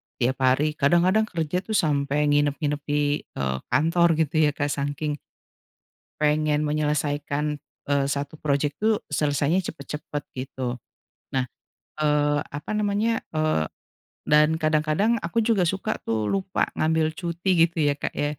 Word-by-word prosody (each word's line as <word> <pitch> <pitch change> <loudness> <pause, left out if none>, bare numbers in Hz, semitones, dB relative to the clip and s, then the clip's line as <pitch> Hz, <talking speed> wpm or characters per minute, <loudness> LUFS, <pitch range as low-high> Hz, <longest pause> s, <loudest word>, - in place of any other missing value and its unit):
tiap 130 +2 0
hari 130 +4 +3
kadang-kadang 175 +9 +3
kerja 165 -1 -1
tuh 215 +3 -4
sampai 145 -3 +2
nginep-nginep 145 0 +1
di, 145 0 +1
eee, 65 -1 -2
kantor 165 +6 +3
gitu 155 -1 +1
ya 145 - -1
Kak, 145 0 -1
saking 145 +1 -2 1.0
pengen 150 0 +2
menyelesaikan, 150 0 -1 0.3
eee, 140 -1 +3
1 140 +2 -3
projek 145 0 0
tuh 215 0 +1
selesainya 145 +3 +1
cepat-cepat, 150 0 -6
gitu. 130 -1 -4 0.6
Nah, 130 -1 +2 0.6
eee, 145 -1 +2
apa 145 +7 -7
namanya, 210 +2 0
eee, 155 - +1 0.6
dan 150 +1 +4
kadang-kadang 155 +8 +1
aku 215 +5 -1
juga 215 -5 +2
suka 195 +5 -1
tuh 110 -2 -2
lupa 190 -1 0
ngambil 160 0 +2
cuti 170 -1 +2
gitu 170 -1 -3
ya, 145 -1 +1
Kak, - - -3
ya. 145 -1 -2
150 Hz, 135 wpm, -25 LUFS, 145-170 Hz, 1.0 s, dan